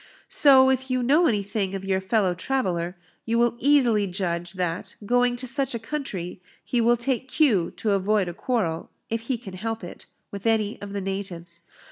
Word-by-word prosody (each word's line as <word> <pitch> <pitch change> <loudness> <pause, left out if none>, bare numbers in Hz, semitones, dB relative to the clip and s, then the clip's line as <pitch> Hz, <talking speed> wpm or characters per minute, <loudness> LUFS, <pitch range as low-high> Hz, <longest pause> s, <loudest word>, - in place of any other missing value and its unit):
So, 265 -2 +6
if 265 0 -1
you 255 -1 0
know 300 +7 +4
anything 200 -2 -1
of 195 0 -5
your 190 -1 0
fellow 190 -1 +1
traveller, 180 -5 -2 0.3
you 230 0 0
will 240 0 +3
easily 245 -7 +3
judge, 175 -1 -3
that, 180 -2 -3
going 245 +2 +2
to 250 +1 -7
such 265 0 -1
a - - 0
country, 225 - -5 0.2
he 245 - +1
will 240 +1 +4
take 260 +1 -2
cue 245 - +2
to 215 - 0
avoid 200 0 +2
a 175 - -4
quarrel, 175 -7 -2 0.2
if 225 0 -1
he 255 - +1
can 205 -5 -10
help 220 +3 -4
it, 175 - -10 0.2
with 200 +2 -4
any 220 -2 +1
of 200 -1 -7
the 200 - -2
natives. 180 -3 -5
215 Hz, 185 wpm, -25 LUFS, 185-245 Hz, 0.3 s, So